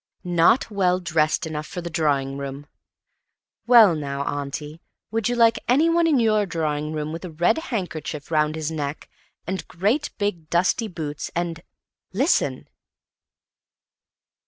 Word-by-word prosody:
"Not 180 +7 +3
well 185 -3 +2
dressed 165 -1 +1
enough 155 -1 -5
for - - -6
the 175 - -5
drawing 140 -4 0
room." 140 +1 -6 1.0
Well, 230 -7 +8
now, 140 -2 -3
Auntie, 145 +3 -5 0.3
would 225 0 0
you 245 - 0
like 230 -1 +4
anyone 330 +6 +3
in 295 -5 +3
your 215 -3 +2
drawing 155 -3 -2
room 155 0 -3
with 165 +3 -6
a 180 - -5
red 175 - +1
handkerchief 170 - -5
round 155 -1 +2
his 160 0 -3
neck 145 -1 -4 0.4
and 190 +2 -4
great 215 - 0
big 190 -7 -2
dusty 185 +6 +1
boots, 155 -6 -5
and—listen! 175 - -2
170 Hz, 135 wpm, -23 LUFS, 150-210 Hz, 1.0 s, Well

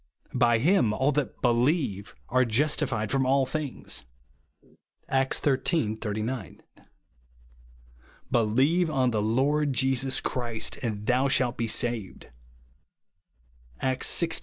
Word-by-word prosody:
By 120 -2 +3
him 140 - +2
all 130 +6 +1
that 145 -2 -2
helierue 120 - +1 0.2
are 130 +1 +3
justified 125 -2 0
from 135 -1 +2
all 135 +1 +2
things," 150 -1 -4 1.0
(Acts 135 0 +1
xiii. 135 -4 +1
89). 110 +1 -4 0.8
" - - -28
Believe 130 +10 +2
on 130 -4 +1
the 110 -2 0
Lord 140 +6 +1
Jesus 130 +1 +1
Christ, 120 -3 -2
and 105 -4 -4
thou 130 +3 +2
shalt 130 -2 +1
be 115 - -2
saved/' 115 -3 -2 1.5
(Acts 130 -1 0
xvi. 165 -2 +1
125 Hz, 110 wpm, -27 LUFS, 110-135 Hz, 1.5 s, By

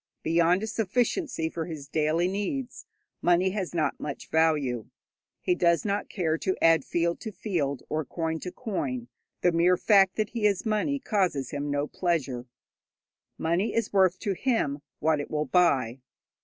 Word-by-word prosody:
Beyond 170 +4 +3
a - - 0
sufficiency 225 - 0
for 160 0 -4
his 155 -4 -7
daily 155 +4 +1
needs 205 +7 -3 0.3
money 175 +2 +3
has 190 -3 -3
not 160 - 0
much 145 - -6
value. 150 -8 +2 0.5
He - - +2
does 170 0 +2
not 205 0 -1
care 165 -4 -1
to 185 - -1
add 165 0 +5
field 170 0 0
to 220 - -6
field 160 - -2
or 155 +1 -1
coin 160 +2 -3
to 180 - -6
coin; 135 - -4 0.3
the 175 - +4
mere 175 +2 +4
fact 195 -2 +4
that 215 -1 -1
he 230 -3 -1
has 200 -1 +2
money 220 +6 +1
causes 185 - 0
him 145 0 -3
no 145 0 0
pleasure. 140 -8 -2 0.9
Money 170 +6 0
is 230 -3 -1
worth 185 -2 +4
to 200 -3 0
him 190 - 0 0.2
what 155 -1 +1
it 145 - -5
will 150 0 -1
buy. 135 -7 +2
170 Hz, 165 wpm, -27 LUFS, 155-200 Hz, 0.9 s, add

